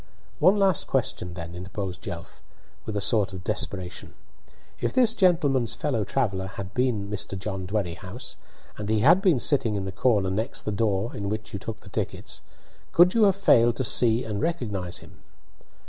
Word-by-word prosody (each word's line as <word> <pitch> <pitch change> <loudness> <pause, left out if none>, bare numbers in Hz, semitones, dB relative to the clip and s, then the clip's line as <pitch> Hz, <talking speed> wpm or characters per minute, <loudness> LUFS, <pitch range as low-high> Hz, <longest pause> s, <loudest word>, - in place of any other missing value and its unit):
"One 185 +6 +6
last 195 -4 +2
question, 90 -1 -1
then," 85 -1 -7
interposed 95 +1 -5
Jelf, - - -8 0.5
with 110 - -3
a - - -1
sort 105 -1 +2
of 90 -1 -7
desperation. 95 -3 -4 0.6
"If - - -1
this 245 -4 +4
gentleman's 150 - +2
fellow 125 -8 -1
traveller 100 -3 -1
had 95 0 -7
been 125 -6 0
Mr. 100 -1 -2
John 95 -1 -4
Dwerrihouse, 95 +3 -4 0.4
and 105 0 -4
he 110 -1 +2
had 170 - +6
been 180 - +3
sitting 120 -5 +2
in 100 -1 -2
the 95 - -4
corner 100 -2 +2
next 110 +7 -2
the 105 - -2
door 100 +1 0
in 100 -1 -3
which 110 +1 -5
you 100 - -3
took 110 +2 -7
the 95 - -13
tickets, - - -4 0.5
could 175 +2 +6
you 225 -2 +5
have 195 -2 +4
failed 120 -12 +4
to 130 - -1
see 115 0 +3
and 105 -2 -3
recognise 105 - -2
him?" - - -18
110 Hz, 180 wpm, -26 LUFS, 95-130 Hz, 0.6 s, One